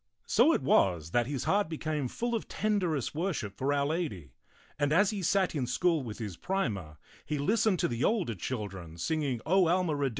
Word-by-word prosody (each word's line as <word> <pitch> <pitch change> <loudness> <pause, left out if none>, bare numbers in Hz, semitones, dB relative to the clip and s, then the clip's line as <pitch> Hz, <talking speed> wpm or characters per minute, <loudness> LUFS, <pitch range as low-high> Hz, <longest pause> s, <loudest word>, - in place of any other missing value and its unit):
So 245 +9 +4
it 145 - +1
was 85 - +2
that 120 +2 +2
his 140 -2 -3
heart 200 -3 +1
became 155 -3 -2
full 240 - -3
of 225 - -2
tenderest 185 - -1
worship 150 - -2
for 135 +5 -1
Our 140 -1 +2
Lady, 140 - -3 0.5
and 145 0 +1
as 195 +6 +4
he 205 -2 -3
sat 185 +1 +2
in 135 -6 -1
school 165 +5 +1
with 115 -5 -6
his 105 -7 -6
primer, 100 - -2 0.3
he 150 - -3
listened 205 +6 +2
to - - +2
the 120 +1 -2
older 200 - +1
children 95 -5 -5
singing 140 - -1
O 185 +1 +4
Alma 175 -2 +2
Rede?? 140 -1 0
150 Hz, 195 wpm, -30 LUFS, 115-185 Hz, 0.5 s, So